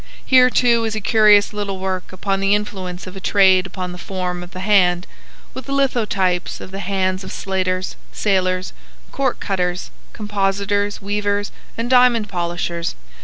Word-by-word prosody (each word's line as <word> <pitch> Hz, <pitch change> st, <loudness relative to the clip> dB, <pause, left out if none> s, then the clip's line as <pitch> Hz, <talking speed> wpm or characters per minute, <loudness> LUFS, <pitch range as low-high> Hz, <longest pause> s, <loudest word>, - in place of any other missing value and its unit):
Here, 255 Hz, -1 st, +6 dB
too, 235 Hz, -2 st, +3 dB
is 220 Hz, -1 st, -2 dB
a -, -, -1 dB
curious 210 Hz, 0 st, +4 dB
little 200 Hz, -2 st, -3 dB
work 185 Hz, -1 st, -4 dB
upon 195 Hz, +1 st, -2 dB
the 195 Hz, +1 st, +3 dB
influence 190 Hz, -3 st, -5 dB
of 185 Hz, 0 st, -9 dB
a -, -, -6 dB
trade 190 Hz, -1 st, +4 dB
upon 185 Hz, -1 st, -5 dB
the 180 Hz, -, -9 dB
form 180 Hz, -1 st, -4 dB
of 175 Hz, -, -9 dB
the 185 Hz, 0 st, -8 dB
hand, 185 Hz, -3 st, +3 dB, 0.5 s
with 260 Hz, +1 st, -8 dB
lithotypes 215 Hz, -10 st, 0 dB
of 185 Hz, -, -9 dB
the 195 Hz, -, -6 dB
hands 185 Hz, -1 st, -1 dB
of -, -, -8 dB
slaters, 185 Hz, -1 st, -2 dB, 0.2 s
sailors, 185 Hz, -2 st, 0 dB, 0.4 s
corkcutters, 190 Hz, -9 st, -2 dB, 0.2 s
compositors, 205 Hz, -1 st, -1 dB
weavers, 205 Hz, 0 st, -1 dB, 0.3 s
and 230 Hz, +1 st, -2 dB
diamond 245 Hz, -4 st, +4 dB
polishers. 170 Hz, -1 st, -3 dB
195 Hz, 150 wpm, -20 LUFS, 185-210 Hz, 0.5 s, Here